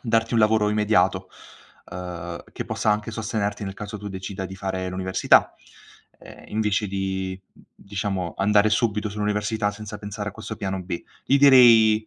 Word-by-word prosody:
"darti 115 -1 +1
un 115 - +4
lavoro 110 -1 +3
immediato, 105 +1 +1 0.6
uhm, 90 -1 -6
che - - -5
possa 110 - 0
anche 105 +2 -1
sostenerti 110 -2 -3
nel 95 -1 -5
caso 105 +1 -7
tu 105 0 -7
decida 95 0 -6
di 95 - -9
fare 95 -1 -3
l'università, 95 0 +2 0.6
ehm, - - -14
invece 105 -1 0
di, 95 -1 -3
mhmm, 95 - -25
diciamo 95 -3 -4
andare 105 +1 +3
subito 105 -1 0
sull'università 105 +1 -1
senza 105 0 -8
pensare 105 0 -5
a - - -18
questo 110 +1 -7
piano 95 -2 -3
B." 90 -1 -5 0.2
Gli 140 - +3
direi: 115 -6 +7
105 Hz, 160 wpm, -24 LUFS, 95-110 Hz, 0.6 s, direi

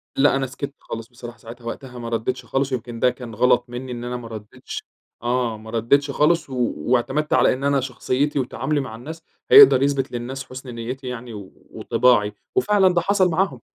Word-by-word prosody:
لأ، 135 0 +4
أنا 135 -1 0
سكَتّ 140 +2 -6
خالص 115 0 -7
بصراحة 120 -1 -11
ساعتها، 115 +2 -12
وقتها 125 +1 -7
ما 115 -1 -5
ردّيتش 115 +3 -2
خالص، 135 0 -1
ويمكن 120 -2 -4
ده 125 - +4
كان 125 -3 -8
غلَط 120 +1 +3
منِّي 125 +1 -6
إن 120 -1 -5
أنا 125 0 -3
ما 120 - -9
ردّيتش، 110 -2 -8 0.4
آه، 120 -2 0
ما 110 +1 -12
ردّيتش 120 +6 +2
خالص، 155 +1 +2
و 125 -2 -1
واعتمَدت 130 +5 0
على - - +4
إن 135 +2 -6
أنا 140 -1 +2
شخصيتي 135 +3 -1
وتعاملي 145 +3 -1
مع 125 -5 -5
الناس 160 +8 -9 0.3
هيقدر 420 - +9
يثبِت 140 -1 0
للناس 125 +3 -5
حُسن 130 -1 -9
نيِّتي 125 +3 -6
يعني 125 -1 -6 0.4
وطباعي، 110 -5 +2 0.2
وفعلًا 205 - +4
ده 175 - +2
حصل 190 0 +2
معاهم. 165 -7 0
125 Hz, 190 wpm, -22 LUFS, 120-140 Hz, 0.4 s, هيقدر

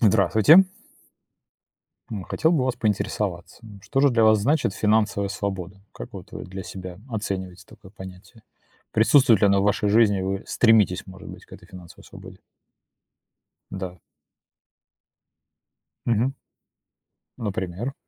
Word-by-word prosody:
Здравствуйте. 110 - +5 1.5
М, 105 -4 -5
хотел 160 - 0
бы 160 - +2
у - - 0
вас 130 -1 -2
поинтересоваться, 100 -4 -3
н 105 -3 -13
что 135 - -1
же 140 0 +4
для 115 -2 +2
вас 110 0 +5
значит 130 -1 0
финансовая 105 -2 +1
свобода? 95 -1 -5
Как - - -10
вот - - -11
вы - - -7
для 95 +1 -8
себя 90 -1 -9
оцениваете 95 -4 -5
такое 95 -2 -17
понятие? 95 +3 -13 0.5
Присутствует 115 -1 +4
ли - - +5
оно 100 0 +3
в - - 0
вашей 105 0 +1
жизни, 105 -2 +3
вы 95 +1 -3
стремитесь, 110 -6 +2
может 95 -1 -12
быть, - - -12
к - - -26
этой 90 - -13
финансовой 90 -3 -14
свободе? 95 -1 -13 1.3
Да. 95 -2 -7 2.1
Мгм. 120 +4 +1 1.0
Например? 105 +3 -4
100 Hz, 135 wpm, -23 LUFS, 95-110 Hz, 2.1 s, Здравствуйте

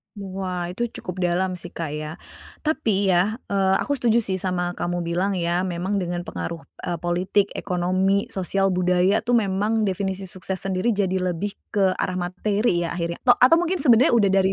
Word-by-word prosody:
Wah 185 -3 -4
itu 210 +7 -2 0.2
cukup 180 0 -4
dalam 180 +1 0
sih 175 0 -10
Kak 165 -2 -4
ya. 150 +1 -5 0.5
Tapi 220 -11 0
ya, 190 +7 +2
eee, 195 -1 +2
aku 285 -1 -1
setuju 235 -2 +3
sih 195 -4 -2
sama 180 -1 -2
kamu 175 0 -2
bilang 175 +4 0
ya, 175 0 0
memang 185 +2 -2
dengan 175 -2 -2
pengaruh, 170 -1 -5 0.2
e 175 -2 -3
politik, 180 +4 +1
ekonomi, 185 +2 0
sosial, 195 +1 0
budaya 180 +3 +2
tuh 245 - 0
memang 210 0 +1
definisi 190 0 -3
sukses 185 0 -5
sendiri 195 +4 0
jadi 195 -3 0
lebih 185 +2 -2 0.2
ke 190 -2 +2
arah 185 - -2
materi 185 0 0
ya - - -2
akhirnya, 170 0 -3
to 245 - +7
atau 255 +7 +7
mungkin 350 +1 0
sebenarnya 250 -3 +5
udah 220 -4 +4
dari 195 0 +3
190 Hz, 180 wpm, -23 LUFS, 175-200 Hz, 0.5 s, to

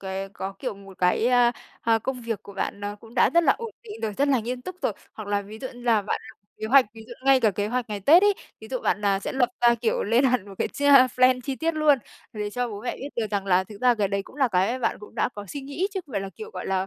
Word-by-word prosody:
cái 195 0 -4
có, 195 0 -6
kiểu, 250 -2 -4
một 195 -1 -14
cái, 180 +5 +2
a, 245 -1 +4 0.3
a, 225 -1 +3
công 250 +3 -4
việc 230 -2 -4
của 200 - -11
bạn 200 +1 -3
nó 205 0 -4
cũng 225 +3 -16
đã - - +4
rất 340 - +6
là - - +6
ổn 460 -1 -6
định 440 -2 -9
rồi, 215 - -1
rất 280 +7 +1
là 265 -4 +3
nghiêm 245 +3 -4
túc 370 +6 -7
rồi. - - +1 0.2
Hoặc 215 -2 -8
là 205 0 0
ví 215 +2 -10
dụ 260 - -5
như 245 - -12
là 230 -3 +3
bạn 205 - -2
lập - - -14 0.2
kế 220 - -2
hoạch, 265 +3 +6
ví 225 - -10
dụ 240 - -8
ngay 270 -1 +5
cả 220 -3 +4
kế 205 +1 -2
hoạch 245 0 -2
ngày 205 -1 -4
Tết 315 - +6
ấy, 410 -1 +5 0.3
ví 220 - -11
dụ, 255 +1 -2
à, - - +1
bạn 200 0 0
sẽ - - -4
lập 260 -3 +2
ra, 240 0 +6
kiểu, 230 -1 0
lên 230 +6 +3
hẳn 250 -6 +1
một 195 - -10
cái - - 0
chi 285 - -5 0.3
plan 255 0 +5
chi 265 +1 -4
tiết 330 0 -1
luôn 305 -3 +4 0.3
về 210 -1 -4
cho 245 +3 -2
bố 205 -2 -7
mẹ 245 - -3
biết 275 - -6
được 230 -2 0
rằng 200 -2 -2
là 185 0 +3
thực 205 +1 -12
ra 250 -1 +5
cái 205 -3 0
đấy 200 0 -1
cũng 260 - -16
là 270 -3 +3
cái 200 +5 +1
bạn 245 - 0
cũng 210 - -12
đã - - +1
có 205 - -7
suy 285 - -5
nghĩ 285 +7 -2
chứ 380 - -1
không 275 - -15
phải 200 - -1
là, 195 - -6
kiểu, 435 +1 -8
gọi - - -6
là, 190 0 0
230 Hz, 315 wpm, -25 LUFS, 205-260 Hz, 0.3 s, rất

